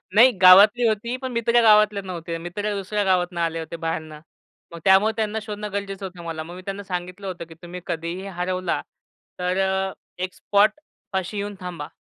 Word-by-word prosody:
नाही. 245 +4 +8
गावातली 205 +6 +8
होती. 220 +3 -1
पण 260 0 -5
मित्र 235 0 +3
गावातले 210 -2 +5
नव्हते, 170 -3 -5
मित्र 205 +5 -4
दुसऱ्या 205 +1 -1
गावातनं 180 -2 +1
आले 165 0 -1
होते 160 +1 -6
बाहेरनं. 160 -2 -4 0.5
मग 170 - -8
त्यामुळं 195 +3 +6
त्यांना 220 0 -1
शोधणं 210 -1 -6
गरजेचं 195 -1 -4
होतं 180 -2 -9
मला. 165 -1 -4
मग 170 +2 -10
मी 185 - -9
त्यांना 195 +1 -5
सांगितलं 180 +1 -5
होतं, 180 -2 -5
की 165 - -13
तुम्ही 175 +1 -8
कधीही 170 +4 -4
हरवला 185 -1 -2 0.6
तर 180 +1 0
अ, 190 0 -1 0.3
एक 185 - -3
स्पॉटपाशी 205 - -1
येऊन 205 0 -4
थांबा. 175 -5 -6
190 Hz, 175 wpm, -23 LUFS, 175-210 Hz, 0.6 s, नाही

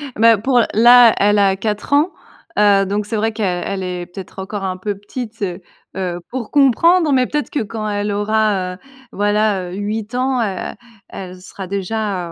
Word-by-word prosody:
Ben, 225 -1 +5
pour 250 +1 +3
là 240 +1 +7
elle 205 +1 +3
a 195 -1 +3
4 210 +5 -3
ans, 300 +6 +3 0.5
heu, 200 -1 +4
donc 205 +2 -2
c'est 225 - -3
vrai 220 +1 0
qu'elle 195 -2 -2
est 180 -1 -4
peut-être 185 +2 -11
encore 195 +1 -5
un 185 -1 -3
peu 205 +2 -3
petite, 220 +3 -8
heu 180 -2 -3 0.4
heu, 180 -2 -3
pour 245 -3 -5
comprendre 305 +4 +4
mais 255 -1 +3
peut-être 295 0 -2
que 285 - -1
quand 215 0 -5
elle 205 0 -2
aura, 205 -3 0
heu, - - -16 0.3
voilà, 205 -2 0
heu, - - -7
8 210 +2 -4
ans, 255 0 0
heu, 195 -4 -4 0.4
elle 185 -1 -9
sera 190 +1 -9
déjà, 195 -1 -3
205 Hz, 180 wpm, -18 LUFS, 190-225 Hz, 0.5 s, là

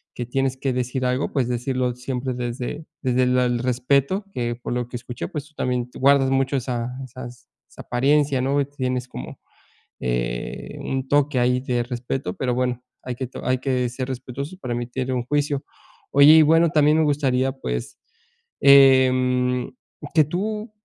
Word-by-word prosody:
que 120 - -4
tienes 135 +1 -1
que 130 0 -1
decir 125 +1 -2
algo, 125 +2 0
pues 130 -4 +1
decirlo 125 0 -1
siempre 125 +1 -3
desde 125 +5 -4 0.2
desde 130 -1 +2
la 125 0 +3
el 120 -1 0
respeto, 135 - +1
que 120 -1 -2
por 120 +1 -5
lo 125 -1 -2
que 120 - -5
escuché, 120 -7 -6
pues 150 -1 -5
tú 155 - -24
también 125 -2 -1
guardas 135 0 +4
mucho 135 +1 +1
esa 120 -2 -3 0.2
esas 125 -1 -10 0.2
esa - - -11
apariencia, 140 +2 +2
¿no?, 140 +2 +1
tienes 130 -3 -3
como, 65 - -8 0.6
eh, - - -3
un 135 0 -3
toque 145 -1 +2
ahí 125 +1 +2
de 125 -2 -1
respeto, 120 -4 -4
pero 125 -2 -1
bueno, 125 -1 -1 0.2
hay 125 -1 -4
que 130 - -4
to 125 - -9
hay 130 0 +2
que 125 -2 0
ser 125 +2 -5
respetuoso 130 +6 -6
para 125 -9 -4
emitir 125 +2 -3
un 125 -1 -1
juicio, 145 0 0 0.5
oye, 140 +2 +8
y 160 - +8
bueno, 165 +2 +4
también 150 0 +4
me 160 - +4
gustaría, 135 -3 +1
pues, - - -5 0.6
em, 130 -2 +5 0.4
que 155 - +7
tú 210 - -3
130 Hz, 170 wpm, -23 LUFS, 125-140 Hz, 0.6 s, oye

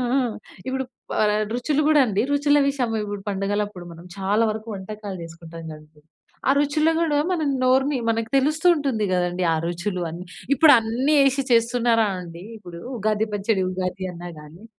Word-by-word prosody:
ఆ! - - +4 0.5
ఇప్పుడు 265 0 -1 0.4
ఆహ్, 210 0 +2
రుచులు 280 +4 0
కూడా 305 -1 +5
అండి 210 -3 0
రుచుల 290 0 +3
విషయము 250 -5 -1
ఇప్పుడు 205 -1 -5
పండగలప్పుడు 200 -1 -2
మనం 170 +1 -13
చాలా 200 +3 +1
వరకు 220 +1 -7
వంటకాలు 200 0 -7
చేసుకుంటాం 165 0 -10
కదండీ. 155 0 -14 0.5
ఆ - - +6
రుచులు 300 +2 +2
కూడా 310 -3 +1
మన 350 -4 0 0.2
నోరుని 265 +2 +3
మనకు 225 0 -1
తెలుస్తూ 305 +5 +2
ఉంటుంది 270 -8 -1
కదండీ 180 0 0
ఆ - - +1
రుచులు 175 +2 -3
అని. 170 +3 -7 0.3
ఇప్పుడన్నీ 260 -1 +4
ఎసి 275 +1 0
చేస్తున్నారా 230 -1 +3
అండి! 170 -1 -9
ఇప్పుడు 175 -5 -10 0.2
ఉగాది 215 +1 0
పచ్చడి 205 -1 0
ఉగాది 185 +1 -3
అన్నా 175 +1 -8
గాని 150 +6 -14
215 Hz, 155 wpm, -23 LUFS, 185-265 Hz, 0.5 s, ఆ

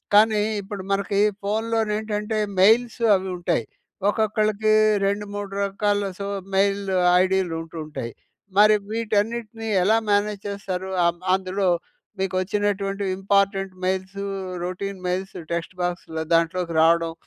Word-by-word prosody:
కానీ 215 0 +5 0.2
ఇప్పుడు 195 -1 -7
మనకి 200 0 +1 0.2
ఫోన్‌లో 225 +3 0 0.2
ఏంటంటే 215 0 -2 0.2
మెయిల్స్ 230 +4 +4
అవి 190 0 -2
ఉంటాయి. 170 -9 0 0.4
ఒక్కొక్కళ్ళకి 215 0 +1 0.3
రెండు 200 +1 0
మూడు 205 -1 -5
రకాల 205 +1 0 0.2
సో, 200 - -3 0.3
మెయిల్ 200 +1 +2 0.4
ఐడీలు 185 -2 +1
ఉంటూ 165 0 -10
ఉంటాయి. 120 -6 -6 0.5
మరి 215 +1 +7 0.2
వీటన్నిటిని 225 0 -1 0.2
ఎలా 215 +4 +4
మేనేజ్ 205 0 +1
చేస్తారు. 190 -2 -4 0.2
అ - - +6 0.3
అందులో 190 +1 0 0.5
మీకు 190 -1 -1
వచ్చినటువంటి 200 0 -1
important 195 0 +1
mails, 190 +1 -2 0.5
routine 190 +2 -4
mails. 190 +2 -3 0.2
Text 170 +2 -3
బాక్స్‌లో 175 -2 -3
దాంట్లోకి 165 +1 +1
రావడం. 165 0 +3
200 Hz, 120 wpm, -23 LUFS, 185-210 Hz, 0.5 s, మరి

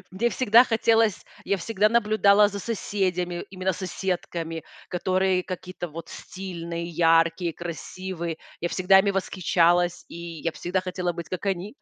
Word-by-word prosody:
Мне 230 +6 0
всегда 240 0 +5
хотелось, 225 -2 +2 0.2
я 200 - +1
всегда 210 +3 +1
наблюдала 210 -2 +4
за 200 - -6
соседями, 185 -5 -2
именно 190 0 -1
соседками, 175 -3 -4 0.2
которые 185 +1 +1
какие-то 185 -1 -6
вот 165 0 -9
стильные, 170 -3 -6
яркие, 165 +1 +3
красивые. 170 +1 -5 0.2
Я 175 - -1
всегда 190 +2 +5
ими 200 0 +3
восхищалась, 175 -2 +2
и - - -9 0.3
я 165 - 0
всегда 180 +3 -2
хотела 180 -1 -2
быть 170 -1 -7
как 185 +2 -5
они. 195 - -2
185 Hz, 135 wpm, -25 LUFS, 170-200 Hz, 0.3 s, всегда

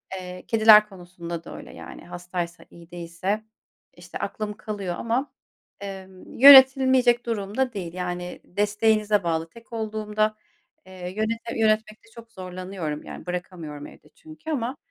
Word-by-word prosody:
Eee, 180 -1 -8
kediler 215 -1 +7
konusunda 175 -3 -8
da - - -9
öyle, - - -11
yani, - - -11
hastaysa, 175 0 -6
iyi 170 0 -16
değilse, 175 +5 -3 0.5
işte, 175 0 -9
aklım 210 +1 -4
kalıyor 200 -5 -4
ama, 240 +5 -1 0.5
emm, 190 -1 -9
yönetilmeyecek 260 -2 +8
durum 210 -1 -4
da 260 -2 +1
değil, 175 -4 -5
yani, 180 -1 -5
desteğinize 210 +1 +1
bağlı 165 -1 -1
tek 230 +4 -16
olduğumda, 215 -1 -1 0.5
eee, 185 - -14 0.2
yönete 225 +2 -2
yönetmekte 215 0 0
çok 230 -1 -13
zorlanıyorum. 185 -4 -6
Yani, - - -9
bırakamıyorum 175 -5 -6
evde - - -17
çünkü 315 0 -12
ama, 260 -1 -2
205 Hz, 135 wpm, -25 LUFS, 180-225 Hz, 0.5 s, yönetilmeyecek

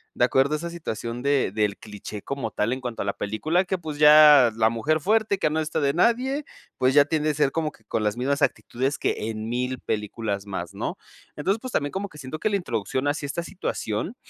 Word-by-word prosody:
De - - +4
acuerdo 135 +3 +2
a - - -1
esa 170 +3 -5
situación 120 -7 -5
de 140 -6 +1
del 105 -1 0
cliché 105 -1 -9
como 140 -5 -3
tal 110 +4 0
en 130 - -5
cuanto 125 -2 -4
a - - -7
la 100 - -1
película 155 - 0
que 190 +1 -1
pues 155 -4 -7
ya 150 -4 +8
la 110 -1 +4
mujer 145 +8 0
fuerte 210 +4 +1
que 170 - +1
no 160 - 0
está 155 0 -1
de 140 -2 +1
nadie, 250 - +2 0.3
pues 130 +1 +2
ya 145 -1 +7
tiende 155 0 0
a - - +1
ser 145 -2 +2
como 155 0 -1
que - - -23
con 110 - -2
las 105 +1 0
mismas 140 +4 0
actitudes 135 0 0
que 110 - -1
en 110 0 -5
1000 125 +2 -2
películas 105 -1 -3
más, 95 - -5
¿no? - - -4 0.4
Entonces, 195 +9 0
pues 255 - -6
también 145 -1 0
como 195 +1 -4
que 150 - -15
siento 140 +2 -7
que - - 0
la 205 - 0
introducción 130 - -2
hacia 145 0 -1
esta 170 +4 -3
situación 170 - -4
140 Hz, 230 wpm, -25 LUFS, 115-160 Hz, 0.4 s, ya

